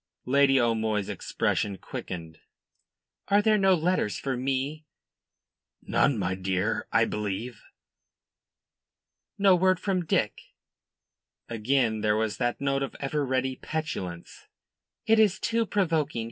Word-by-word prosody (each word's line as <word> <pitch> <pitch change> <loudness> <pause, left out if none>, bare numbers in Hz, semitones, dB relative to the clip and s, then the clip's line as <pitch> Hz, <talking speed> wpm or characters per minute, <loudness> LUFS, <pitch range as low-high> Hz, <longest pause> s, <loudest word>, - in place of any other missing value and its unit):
Lady 135 +1 +4
O'Moy's 110 -3 0
expression 100 -2 -1
quickened. 85 -3 -7 0.9
"Are 200 +1 +4
there 215 0 +3
no 190 -1 +5
letters 170 - 0
for 135 -1 -2
me?" 135 +4 -2 1.0
"None, 140 - +2
my 95 -2 -1
dear, 95 +3 -1
I 115 +1 +4
believe." 105 +3 -4 1.8
"No 195 -2 +5
word 185 0 +3
from 190 -3 -1
Dick?" 110 -8 0 1.1
Again 115 -1 0
there 105 0 +2
was 110 -1 -1
that 120 -1 -1
note 140 0 0
of 135 - -4
ever 145 +1 -1
ready 130 -1 -1
petulance. 95 - -5 0.6
"It 225 0 +4
is 210 -3 +4
too 230 -1 0
provoking. 160 - 0
130 Hz, 120 wpm, -27 LUFS, 110-165 Hz, 1.8 s, no